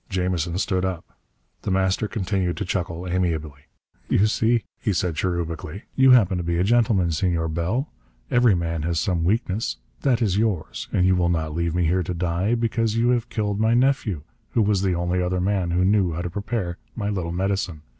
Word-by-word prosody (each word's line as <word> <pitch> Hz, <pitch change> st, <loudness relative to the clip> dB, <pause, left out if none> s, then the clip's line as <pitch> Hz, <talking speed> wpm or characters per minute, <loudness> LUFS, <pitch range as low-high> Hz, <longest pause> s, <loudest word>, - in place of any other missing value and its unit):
Jamison 90 Hz, -3 st, -1 dB
stood 95 Hz, -1 st, 0 dB
up. 95 Hz, -3 st, -4 dB, 0.5 s
The -, -, -4 dB
Master 95 Hz, +2 st, +1 dB
continued 95 Hz, -4 st, -1 dB
to -, -, -2 dB
chuckle 90 Hz, -1 st, -3 dB
amiably. 80 Hz, -5 st, -2 dB, 0.4 s
"You 100 Hz, -, +4 dB
see," 115 Hz, +1 st, +2 dB, 0.2 s
he 105 Hz, -, 0 dB
said 90 Hz, -1 st, 0 dB
cherubically, 85 Hz, +1 st, -3 dB
"you 135 Hz, 0 st, +5 dB
happen 100 Hz, -8 st, +5 dB
to -, -, -3 dB
be 85 Hz, 0 st, -1 dB
a 90 Hz, -, +2 dB
gentleman, 110 Hz, -5 st, +3 dB
Senor 80 Hz, 0 st, 0 dB
Bell. 90 Hz, -, -1 dB, 0.4 s
Every 120 Hz, -5 st, +5 dB
man 85 Hz, -2 st, -2 dB
has 85 Hz, +1 st, 0 dB
some 85 Hz, -3 st, 0 dB
weakness. 105 Hz, +2 st, 0 dB, 0.2 s
That 130 Hz, -5 st, +2 dB
is 105 Hz, -4 st, +1 dB
yours. 105 Hz, -7 st, -1 dB
And 90 Hz, -, +2 dB
you 95 Hz, 0 st, +4 dB
will 90 Hz, -1 st, +2 dB
not 80 Hz, -3 st, -1 dB
leave 85 Hz, 0 st, -1 dB
me 90 Hz, -1 st, +2 dB
here 90 Hz, +3 st, +2 dB
to 90 Hz, +1 st, -3 dB
die, 90 Hz, +6 st, 0 dB
because 115 Hz, -1 st, 0 dB
you 120 Hz, +1 st, +3 dB
have 120 Hz, -2 st, +1 dB
killed 105 Hz, -2 st, -1 dB
my 110 Hz, +2 st, +3 dB
nephew, 120 Hz, -, +1 dB, 0.3 s
who 115 Hz, -, +3 dB
was 100 Hz, -2 st, +2 dB
the 95 Hz, -2 st, +1 dB
only 90 Hz, +1 st, 0 dB
other 90 Hz, +1 st, 0 dB
man 95 Hz, -1 st, 0 dB
who 90 Hz, +2 st, +2 dB
knew 95 Hz, -4 st, +2 dB
how 85 Hz, +2 st, -3 dB
to 90 Hz, -, -4 dB
prepare 100 Hz, -3 st, -3 dB, 0.2 s
my 105 Hz, -3 st, -2 dB
little 90 Hz, -4 st, -2 dB
medicine. 95 Hz, -3 st, -2 dB
95 Hz, 195 wpm, -23 LUFS, 85-105 Hz, 0.5 s, you